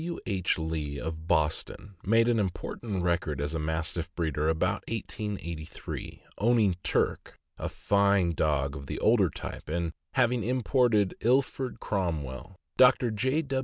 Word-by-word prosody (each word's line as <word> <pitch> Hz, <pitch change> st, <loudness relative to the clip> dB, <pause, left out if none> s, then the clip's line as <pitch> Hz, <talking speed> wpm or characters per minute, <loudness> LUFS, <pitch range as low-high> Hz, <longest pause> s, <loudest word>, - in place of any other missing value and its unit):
W. 170 Hz, 0 st, -3 dB
H. 95 Hz, -4 st, 0 dB
Lee, 80 Hz, -3 st, -3 dB
of 80 Hz, +1 st, -5 dB
Boston, 80 Hz, +5 st, 0 dB
made 115 Hz, +3 st, +4 dB
an 120 Hz, -2 st, +3 dB
important 95 Hz, 0 st, -3 dB
record 85 Hz, -5 st, 0 dB
as 75 Hz, +2 st, -2 dB
a 80 Hz, -, -1 dB
Mastiff 80 Hz, +2 st, -2 dB
breeder 80 Hz, -2 st, 0 dB
about 90 Hz, +6 st, 0 dB
1883, 100 Hz, -8 st, -5 dB, 0.2 s
owning 110 Hz, -4 st, +3 dB
Turk, -, -, -1 dB, 0.2 s
a -, -, -2 dB
fine 100 Hz, -3 st, +2 dB
dog 75 Hz, -3 st, 0 dB
of 70 Hz, -1 st, -8 dB
the -, -, -4 dB
older -, -, +4 dB
type, -, -, -7 dB
and 85 Hz, 0 st, -1 dB, 0.2 s
having 125 Hz, -3 st, +3 dB
imported 120 Hz, -4 st, +2 dB
Ilford 130 Hz, +1 st, +1 dB
Cromwell. 80 Hz, -, -3 dB, 0.2 s
Dr. 125 Hz, -2 st, +6 dB
J. 130 Hz, +9 st, +1 dB
90 Hz, 135 wpm, -29 LUFS, 80-115 Hz, 0.2 s, Dr